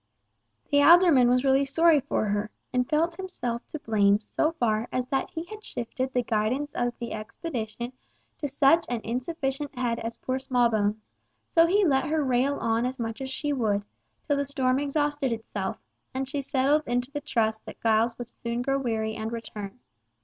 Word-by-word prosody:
The 285 0 +5
alderman 315 -5 +7
was 250 +1 +3
really 270 +1 +4
sorry 320 +3 +4
for 245 - -1
her, 205 +1 -1 0.2
and 250 0 +1
felt 330 +2 +1
himself 250 -11 -4
to - - -6
blame 205 -6 +3
so 310 +9 0
far 230 -6 0
as 255 -1 -1
that 270 -2 0
he 325 - -5
had 430 +4 -10
shifted 255 - -3
the 250 -1 +1
guidance 235 +7 -1
of 245 0 -1
the 235 - -5
expedition 235 0 -5 0.5
to 290 - -2
such 285 +4 +4
an 240 -2 -2
insufficient 270 +2 -3
head 240 -2 0
as 230 +1 -5
poor 260 0 -2
Smallbones, 220 -5 0 0.4
so 330 -1 +5
he 400 +3 +3
let 270 -4 +3
her 310 0 +1
rail 260 +2 +2
on 230 +1 +1
as 260 +1 -5
much 225 0 -4
as 265 - -4
she 290 +2 -1
would, 210 -6 0 0.4
till 290 -2 +1
the 280 - +1
storm 265 -2 +1
exhausted 290 -1 0
itself, 215 -4 -4 0.4
and 265 0 -2
she 280 +1 -2
settled 275 +2 +2
into 245 +2 -1
the 290 0 -4
trust 220 -5 0
that - - -9
Giles 225 +1 +2
would 245 -1 -7
soon 235 0 -4
grow 275 +1 +1
weary 220 -4 -1
and 220 0 -4
return. 225 -1 -7
255 Hz, 185 wpm, -27 LUFS, 230-285 Hz, 0.5 s, alderman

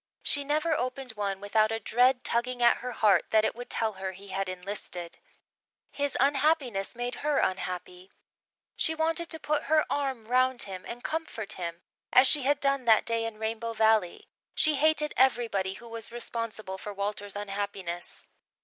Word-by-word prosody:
She 285 - 0
never 305 +3 +1
opened 255 -1 -3
one 200 -3 -3
without 215 +2 +2
a 225 - -1
dread 250 +4 +3
tugging 245 +1 0
at 235 - +6
her 250 - -5
heart 205 -6 +3
that 220 0 +4
it - - 0
would 245 +1 -9
tell 220 -1 0
her 190 -1 -3
he 195 +2 -12
had 190 0 -2
enlisted. 180 -2 -5 0.7
His 285 -1 -1
unhappiness 275 -7 +2
made 245 +1 -3
her 295 -1 +1
unhappy. 180 0 -2 0.7
She 320 - 0
wanted 325 +1 0
to 320 - 0
put 300 -1 -1
her 310 +1 +3
arm 270 -5 -1
round 255 0 +2
him 190 -2 -8
and 240 +1 -7
comfort 310 -10 -3
him, 170 -1 -6 0.3
as 255 - +7
she 290 +2 +5
had 280 +2 +2
done 275 -2 +1
that 225 -2 +5
day 230 0 0
in 225 -1 -5
Rainbow 225 +1 -3
Valley. 220 -5 +2 0.3
She 310 - +3
hated 300 +1 +2
everybody 230 -7 +2
who 235 +4 -11
was 230 0 -6
responsible 230 -5 -4
for 210 - -6
Walter's 205 0 -4
unhappiness. 195 -3 -5
230 Hz, 170 wpm, -28 LUFS, 200-270 Hz, 0.7 s, as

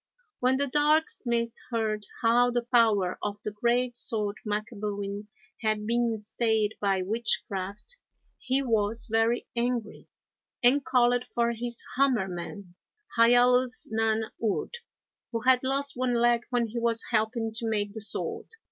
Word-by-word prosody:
When 255 +1 +2
the 285 - +1
Dark 300 +3 +2
Smith 235 -2 -2 0.2
heard 215 -3 -2 0.2
how 240 +2 +4
the 240 -1 -1
power 225 -7 +2
of 205 0 -3
the 210 - -3
great 240 +3 0
sword 210 -3 -2
Macabuin 205 -1 -4 0.3
had 215 -2 0
been 235 0 +1
stayed 220 0 0
by 195 -2 +1
witchcraft, 210 - -2 0.4
he 265 +1 0
was 225 -2 +1
very 225 +2 +2
angry, 235 -2 -2 0.6
and 265 +4 +5
called 245 -1 +3
for 235 -1 0
his 235 0 -5
Hammer 255 -8 +3
man, 180 +1 -7 0.4
Hiallus 245 +2 +4
nan 220 0 0
urd, 220 - -1 0.6
who 230 -2 -2
had 255 +1 +5
lost 275 +2 -1
one 250 -1 0
leg 240 0 +2
when 240 -2 0
he 235 +2 -3
was 230 -1 0
helping 225 0 0
to 225 0 -1
make 205 -2 -1
the 220 - -6
sword. 200 - -3
230 Hz, 140 wpm, -28 LUFS, 210-245 Hz, 0.6 s, and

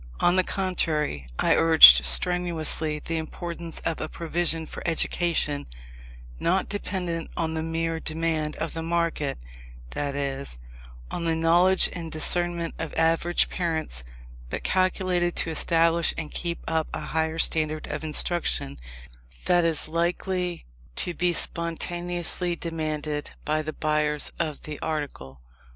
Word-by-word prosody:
On 175 - +3
the 185 - +4
contrary, 155 - -1
I - - +3
urged 65 - +9
strenuously 160 - +3
the 165 +2 -4
importance 170 +1 -6
of 165 - -3
a - - -4
provision 165 -1 -2
for - - -9
education, 165 -3 0 0.7
not 185 +2 +1
dependent 180 -5 -4
on 160 -1 -1
the 160 - -2
mere 165 0 -2
demand 160 -1 -2
of 160 - -4
the 165 - -4
market, 165 -3 -1 0.5
that 140 -1 -3
is, 140 - -3 0.5
on 170 - -3
the 165 -1 +1
knowledge 175 +3 +4
and 165 -2 -6
discernment 170 +1 +1
of 165 - -5
average 165 +1 +2
parents, 160 - -2 0.5
but - - -5
calculated 185 -1 +1
to 165 - 0
establish 165 +1 +2
and 155 -2 -5
keep 170 -1 -3
up 160 -1 0
a - - -4
higher 160 0 -2
standard 155 -1 +2
of 150 +1 -5
instruction 155 - 0 0.7
than 175 -1 +3
is 165 -2 0
likely 175 +2 -2 0.3
to 175 - -2
be 180 +1 +1
spontaneously 175 +1 -2
demanded 155 -3 -4 0.2
by 155 +1 0
the 155 0 -5
buyers 150 -1 0
of 155 -2 -3
the 150 -1 -7
article. 135 - -5
165 Hz, 135 wpm, -25 LUFS, 155-175 Hz, 0.7 s, urged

